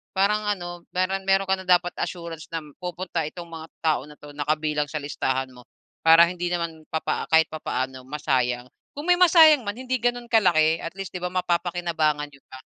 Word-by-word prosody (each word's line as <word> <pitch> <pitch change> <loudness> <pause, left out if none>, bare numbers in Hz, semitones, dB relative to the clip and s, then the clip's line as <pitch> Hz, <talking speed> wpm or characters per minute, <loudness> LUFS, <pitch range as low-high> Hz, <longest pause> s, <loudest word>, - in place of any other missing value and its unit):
Parang 210 +2 +2
ano, 175 -4 -3
meron 190 +1 0
meron 195 0 +2
ka 190 - +4
na 190 - -9
dapat 180 -1 +4
assurance 170 -2 -5
na 165 -1 -3 0.2
pupunta 180 -1 -3
itong 170 +2 -9
mga 160 -1 -8 0.2
tao 155 -2 +2
na 150 - -13
'to, 145 - -12
na 145 - -2
kabilang 150 -1 0
sa - - -9
listahan 135 -2 -2
mo 125 -1 -15 0.4
para 165 +1 +8
hindi 175 0 -3
naman 165 -2 -3
papaa 160 - -2
kahit 160 0 +5
papaano 130 -4 -4
masayang. 130 -4 0 0.3
Kung 295 +4 -6
may 355 - +5
masayang 320 -6 +7
man, 205 - -2
hindi 255 0 -2
ganun 245 0 -1
kalaki. 165 -7 +4
At 170 +2 -6
least, 195 -2 -6
di - - -3
ba, 180 - -1
mapapakinabangan 170 -4 0
niyo 140 - -18
pa. 130 - -10
170 Hz, 195 wpm, -24 LUFS, 155-190 Hz, 0.4 s, para